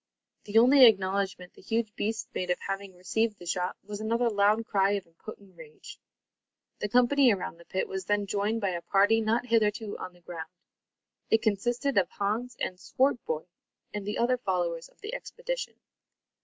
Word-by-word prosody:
The 210 +1 0
only 255 +2 +8
acknowledgment 195 -3 0
the - - -17
huge 225 +1 -1
beast 225 +2 -2
made 180 - -3
of 180 - +2
having 195 -1 -4
received 210 +4 -1
the 175 - -12
shot, 180 +1 -2
was 205 0 -7
another 230 +2 +1
loud 210 +2 +3
cry 195 -1 +2
of 200 -2 -2
impotent 190 +3 -13
rage. 155 -2 -12 0.8
The 210 - -2
company 250 +3 +5
around 185 -4 -3
the 170 - -15
pit 190 - -2
was 190 -1 -5
then 205 +1 +1
joined 205 +3 -1
by 200 - +1
a 170 -1 -3
party 205 +5 +3
not 225 +3 +1
hitherto 220 -2 0
on 185 - -7
the 175 - -22
ground. 170 -2 -7 0.8
It 225 - +3
consisted 240 +4 +1
of 180 -2 0
Hans 220 +5 -2
with 180 - -3
Swartboy 245 - 0 0.5
and 210 -1 -4
the 210 +1 -3
other 250 +2 +2
followers 175 -6 -2
of - - -30
the 430 +3 -6
expedition. - - -5
205 Hz, 175 wpm, -28 LUFS, 185-230 Hz, 0.8 s, only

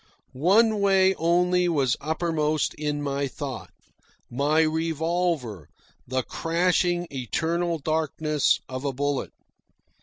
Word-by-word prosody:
One 205 - +3
way 195 -1 +4
only 180 +2 +2
was 140 -6 +1
uppermost 155 0 0
in 150 -1 -3
my 140 0 -1
thought 135 -2 -6 0.6
my 145 +5 +2
revolver, 160 - -1 0.4
the 130 +1 -1
crashing 175 +2 0
eternal 165 +6 -1
darkness 155 -1 0
of 130 +1 -6
a 140 -1 -1
bullet. 145 +1 -2
155 Hz, 100 wpm, -25 LUFS, 140-175 Hz, 0.6 s, way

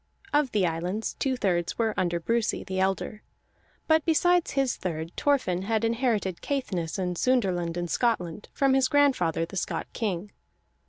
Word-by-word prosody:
Of 290 -3 +3
the 205 -3 +2
islands, 175 +6 -2
two 260 -2 0
thirds 175 -6 0
were 225 -2 +1
under 175 -1 0
Brusi, 230 +5 0
the 190 0 -3
elder; 195 +3 -1 0.6
but 315 -1 +3
besides 350 +2 +3
his 270 -2 +1
third 165 -2 -4
Thorfinn 255 -11 +1
had 220 +3 0
inherited 230 -6 0
Caithness 190 - -2
and 180 -2 -1
Sunderland 180 -8 +1
in 175 0 -2
Scotland 205 -4 -1
from 275 -1 +2
his 265 -1 +4
grandfather 255 - +2
the 195 - -8
Scot - - -2
king. 205 -3 -3
210 Hz, 155 wpm, -27 LUFS, 175-255 Hz, 0.6 s, his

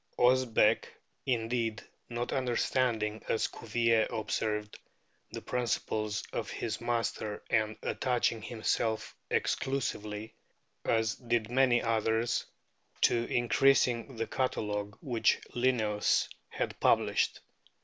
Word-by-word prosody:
Osbeck, 125 -3 +4 0.4
indeed, 115 -3 0 0.3
"not 120 0 -3
understanding," 120 -4 0
as 110 - +2
Cuvier 115 0 +1
observed, 105 -1 -2 0.5
"the - - -6
principles 110 -4 -1
of - - -3
his 110 0 -3
master, 115 -3 -2
and 110 -1 +1
attaching 120 -3 0
himself 110 0 -1
exclusively, 110 -5 -1 0.5
as 110 -1 +2
did 120 -2 -1
many 125 -2 +4
others, 115 +1 +1 0.5
to 120 0 +3
increasing 125 0 +3
the 115 0 -1
catalogue 105 -6 -2
which 115 -5 +2
Linnaeus 115 -4 +2 0.2
had - - -3
published - - +2
115 Hz, 95 wpm, -31 LUFS, 110-120 Hz, 0.5 s, Osbeck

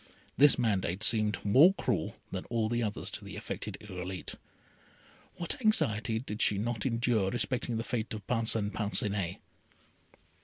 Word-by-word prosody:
This 145 +1 +7
mandate 100 -5 0
seemed 110 -2 +3
more 145 - +6
cruel 115 - -1 0.2
than - - -4
all 115 -2 -1
the 120 +1 0
others 105 -3 -2
to - - -6
the - - -8
afflicted - - -5
Irolite. 95 -2 -6 1.0
What 170 +8 -3
anxiety 110 - +1
did 110 -3 -5
she 105 - +3
not 115 +2 -2
endure 115 -4 +1
respecting 120 +1 -1
the 115 - -2
fate 115 -2 -3
of 105 -3 -9
Parcin 115 -3 0
Parcinet. 100 -4 0
110 Hz, 145 wpm, -30 LUFS, 105-120 Hz, 1.0 s, This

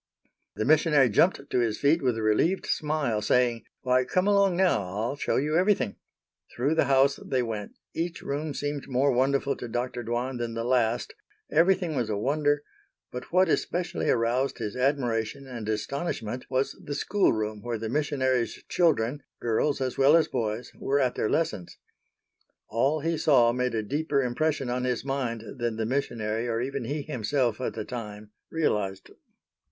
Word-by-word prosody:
The 110 - -1
missionary 150 -3 +4
jumped 140 - +2
to - - 0
his 115 -3 0
feet 150 +4 +3
with 125 -4 +1
a 110 - -3
relieved 135 - +2
smile 150 -8 0
saying, 120 0 +1 0.2
"Why, 130 -1 +3
come 185 +8 0
along 200 -3 +3
now. 185 - +3
I'll 105 +8 -3
show - - -1
you 150 +3 +1
everything." 175 - +2 0.6
Through 135 +6 +1
the 160 - +3
house 135 +1 +4
they 130 -2 0
went; 110 -3 -5 0.2
each 170 +1 -3
room 145 +1 -3
seemed 145 -1 -3
more 135 +2 +2
wonderful 135 +2 +1
to - - -6
Dr. 120 +1 -3
Dwan 120 +2 -2
than 115 -1 -3
the 115 - -2
last, 120 -1 +1 0.4
everything 175 0 +3
was 120 -4 -1
a 105 - -1
wonder, 145 +5 +1 0.5
but 125 0 -7
what 185 +2 +4
especially 175 +2 -1
aroused 120 +3 +1
his 110 -3 -4
admiration 125 -2 0
and 120 -5 -6
astonishment 120 0 -3
was 130 +1 0
the 145 - -4
school 200 +7 +2
room 110 -1 -3
where 120 0 -3
the 110 +1 -4
missionaries' 130 -3 0
children—girls 140 -3 0
as 130 0 -2
well 140 +4 +7
as 165 - +2
boys—were 120 +4 -2
at 130 -3 +2
their - - -1
lessons. 105 - -1 0.9
All 135 +8 +1
he 165 0 -1
saw 125 -6 +5
made 125 -1 -1
a 110 - 0
deeper 145 +4 0
impression 135 +2 0
on 125 +1 -1
his 125 0 -1
mind 125 -5 -2 0.2
than 120 -1 -1
the 110 0 -2
missionary 115 -3 -1
or 115 -1 -1
even 135 0 -3
he 145 +3 -3
himself 125 -3 -1
at - - -3
the 110 -2 -4
time 105 -3 -7 0.2
realized. 105 -12 -1
130 Hz, 170 wpm, -27 LUFS, 115-145 Hz, 0.9 s, well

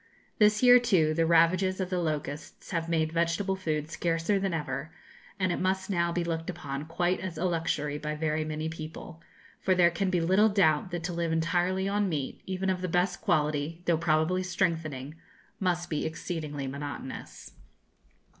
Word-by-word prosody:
This 210 +1 +4
year, 250 0 +9
too, 185 -11 +3
the 165 0 +2
ravages 185 +3 +3
of 185 0 -2
the 180 - +1
locusts 150 -2 -4
have 165 -2 -1
made 160 -1 +1
vegetable 170 +4 0
food 155 -4 -2
scarcer 165 +4 0
than 195 -1 -1
ever, 160 0 -3 0.5
and 185 -1 +1
it - - -1
must 190 +1 0
now 170 -2 +1
be 175 0 -1
looked 165 0 -3
upon 140 -4 -5
quite 175 +2 0
as 180 -4 -5
a 175 - -1
luxury 155 -4 -1
by 150 0 -3
very 155 0 0
many 155 0 -3
people; 160 +1 -8 0.4
for 185 - +2
there 175 -1 +5
can 185 +3 -1
be 180 -1 +1
little 190 +6 +4
doubt 180 -5 +3
that 175 -2 -4
to 175 +1 -3
live 170 -1 -1
entirely 175 +3 +1
on 205 0 +1
meat, 145 -5 -3
even 190 0 -2
of 180 -1 -2
the 185 - -1
best 180 +1 0
quality, 150 +2 0
though 170 - +3
probably 160 +2 +1
strengthening, 165 -6 -2 0.5
must 175 -2 0
be 150 -3 -2
exceedingly 155 -3 -4
monotonous. 140 0 -7
170 Hz, 175 wpm, -29 LUFS, 155-185 Hz, 0.5 s, year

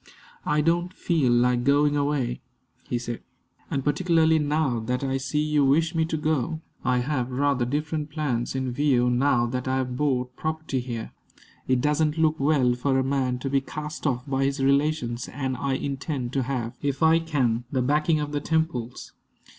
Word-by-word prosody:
"I 150 0 +2
don't 175 +3 0
feel 155 -8 +1
like 120 0 +3
going 145 +2 +3
away," 140 -4 -1 0.5
he 120 - 0
said, 120 -1 -5 0.5
"and 135 - -1
particularly 160 +1 +3
now 145 -4 +1
that 125 +4 -2
I 135 0 0
see 135 +3 -1
you 150 -1 +2
wish 160 +5 +3
me 165 -1 +1
to 160 0 -2
go. 155 0 -1 0.2
I 125 -1 +2
have 125 -1 -1
rather 135 -1 +1
different 150 +3 -2
plans 135 -6 -2
in 130 -1 -1
view 125 -2 +2
now 125 -1 +3
that 125 +2 -3
I 130 - +1
have 125 -1 -2
bought 125 -3 0
property 155 -4 -2
here. 120 -3 -5 0.6
It 130 -1 +2
doesn't 150 +2 +1
look 160 -1 +2
well 135 -3 +3
for 130 +2 0
a 130 - +2
man 130 -2 0
to 135 - -2
be 135 -1 +3
cast 150 +3 -5
off 125 -2 -1
by 135 -1 0
his 140 +1 -1
relations; 140 -3 +1
and 130 -2 -3
I 135 +2 -1
intend 135 -2 -3
to 135 - +1
have, 120 -3 -3
if 140 +1 -1
I 160 +1 +6
can, 130 -8 0
the 130 -2 +1
backing 150 +4 +2
of 150 -1 -3
the 145 -1 -2
Temples." 150 -7 -2
140 Hz, 185 wpm, -25 LUFS, 125-150 Hz, 0.6 s, I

